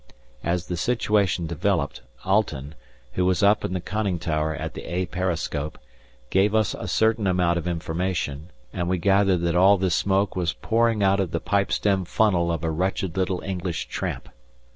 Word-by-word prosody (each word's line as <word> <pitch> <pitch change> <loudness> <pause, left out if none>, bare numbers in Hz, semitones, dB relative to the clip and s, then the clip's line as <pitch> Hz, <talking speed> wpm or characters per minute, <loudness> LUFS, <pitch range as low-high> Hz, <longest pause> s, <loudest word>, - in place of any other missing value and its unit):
As 85 0 -1
the 90 - -4
situation 100 -4 +1
developed, 85 -1 -1 0.2
Alten, 80 -8 0 0.4
who 90 - 0
was 95 +2 +2
up 105 +1 +4
in - - -2
the 90 - -1
conning 100 -1 -2
tower 80 -2 -1
at - - -5
the - - -7
"A" 90 +1 0
periscope, 80 -4 -3 0.5
gave 100 +3 +3
us 110 -1 +2
a 115 - -6
certain 110 +2 +2
amount 90 -2 +2
of 85 - -6
information, 80 -3 -2 0.2
and 85 0 -2
we 90 - +1
gathered 95 0 +3
that 85 0 0
all 95 +3 +6
this 95 -2 0
smoke 95 +4 +1
was 90 -3 0
pouring 115 -2 +1
out 100 0 +3
of 95 -3 0
the 85 - -2
pipe 100 +4 0
stem 95 -2 +1
tunnel 90 -4 +2
of 85 -1 -3
a 80 - 0
wretched 90 +1 -1
little 95 -1 -1
English 90 -3 -3
tramp. - - -4
90 Hz, 180 wpm, -24 LUFS, 85-100 Hz, 0.5 s, all